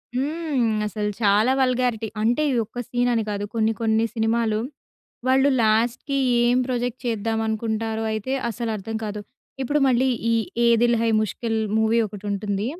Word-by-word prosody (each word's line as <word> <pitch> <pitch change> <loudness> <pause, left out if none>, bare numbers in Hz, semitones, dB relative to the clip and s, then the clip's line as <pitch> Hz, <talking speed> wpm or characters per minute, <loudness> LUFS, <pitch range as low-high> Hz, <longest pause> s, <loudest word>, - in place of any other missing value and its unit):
హ్మ్. 290 -2 -1 0.2
అసలు 210 -1 -2
చాలా 210 +4 +4
వల్గారిటీ. 250 -3 +1
అంటే 240 +6 +2
ఈ - - 0
ఒక్క 235 +3 -9
సీన్ 245 0 0
అని 225 -1 +1
కాదు. 205 0 -3
కొన్ని 225 0 +2
కొన్ని 220 0 +2
సినిమాలు 225 -1 +1 0.7
వాళ్ళు 265 +2 +4
లాస్ట్‌కి 230 +5 +1 0.3
ఏం 245 +1 +3
ప్రొజెక్ట్ 245 -1 -2
చేద్దాం 225 0 -1
అనుకుంటారో 220 0 -2
అయితే 220 +4 -3 0.2
అసలు 235 0 -4
అర్థం 220 +2 -5
కాదు. 210 0 -4 0.4
ఇప్పుడు 290 +4 +1
మళ్ళీ 260 +1 +3 0.2
ఈ - - +3 0.3
'ఏ - - +5 0.2
దిల్ 240 -1 +4
హై 230 - +2
ముష్కిల్' 225 +2 -2 0.2
మూవీ 220 +1 +2
ఒకటి 205 0 -10
ఉంటుంది. 200 +1 -2
225 Hz, 155 wpm, -23 LUFS, 220-245 Hz, 0.7 s, ఏ